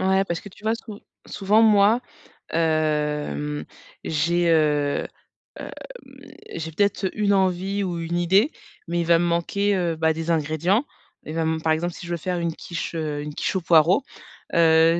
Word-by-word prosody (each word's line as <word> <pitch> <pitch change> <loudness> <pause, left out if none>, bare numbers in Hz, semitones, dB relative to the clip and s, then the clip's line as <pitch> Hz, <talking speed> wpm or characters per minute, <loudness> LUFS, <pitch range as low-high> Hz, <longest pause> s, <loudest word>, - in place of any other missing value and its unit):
Ouais 190 +1 +2
parce 170 -3 -3
que 205 - -11
tu 210 +3 -18
vois 220 +1 +2
sou 215 -2 -10 0.3
souvent 210 +3 +2
moi, 215 +2 +5 0.5
hem, 150 -2 -1 0.4
j'ai, 170 +3 +1
heu, 150 -3 +2 0.5
hem, - - -7 0.8
j'ai 160 0 -5
peut-être 200 +1 0
une 205 -1 +1
envie 190 +1 +1
ou 175 -3 -3
une 170 +1 -2
idée 195 - +3 0.4
mais 170 0 -1
il - - -2
va 170 0 +5
me 175 - +1
manquer, 195 +4 0
heu, 175 -3 0
bah 160 0 +2
des 165 +1 -5
ingrédients. 165 - +1 0.4
Il 155 - -6
va 165 - -1
m 160 0 -1
par 160 0 +2
exemple 170 +2 -2
si 175 - -9
je 175 - -6
veux 170 - -1
faire 180 +2 -3
une 170 -1 -1
quiche, 170 -1 -5
heu, 150 -2 -3
une 150 0 -6
quiche 190 - -2
aux 185 - 0
poireaux, 170 - +4 0.5
heu, 165 0 +5
170 Hz, 180 wpm, -23 LUFS, 160-190 Hz, 0.8 s, moi